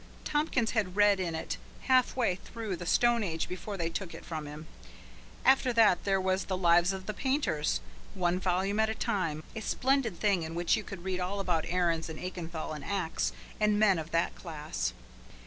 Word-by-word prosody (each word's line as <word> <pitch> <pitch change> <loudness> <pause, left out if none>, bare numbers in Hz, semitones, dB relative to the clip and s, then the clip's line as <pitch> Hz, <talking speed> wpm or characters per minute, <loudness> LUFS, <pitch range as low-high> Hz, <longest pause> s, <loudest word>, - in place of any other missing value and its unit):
Tompkins 295 -6 +1
had 200 -6 0
read 205 -1 +5
in 170 -3 -1
it 160 - -3 0.2
half 255 -2 +3
way 240 -7 +2
through 215 +2 -5
the 175 0 -7
Stone 240 +1 +4
Age 165 -4 -2
before 190 +3 -5
they 170 -2 -1
took 185 0 -4
it - - -10
from 155 -3 -5
him. 150 +2 -8 0.8
After 260 -1 +5
that 220 -6 +4
there 195 -1 +3
was 190 0 0
the 185 - -2
"Lives 175 0 +4
of 190 -1 -5
the 215 - -3
Painters," 260 - 0 0.3
one 180 -1 +1
volume 190 +3 0
at 220 0 +3
a 220 - -2
time 185 -11 -1
a 220 - -4
splendid 255 -6 +1
thing 200 -4 +2
in 160 0 -5
which 175 0 +2
you 215 - -3
could 195 -3 -8
read 185 -1 -2
all 185 +3 -2
about 175 -5 0
Aahrens, 170 -2 +1
and 160 - -6
Aachenthal, 170 -3 -5
and 150 - -7
Aax 190 -5 -1 0.3
and 210 -1 +3
men 200 -5 +4
of 160 0 -6
that 165 0 +1
class. 150 - -4
185 Hz, 200 wpm, -30 LUFS, 170-215 Hz, 0.8 s, read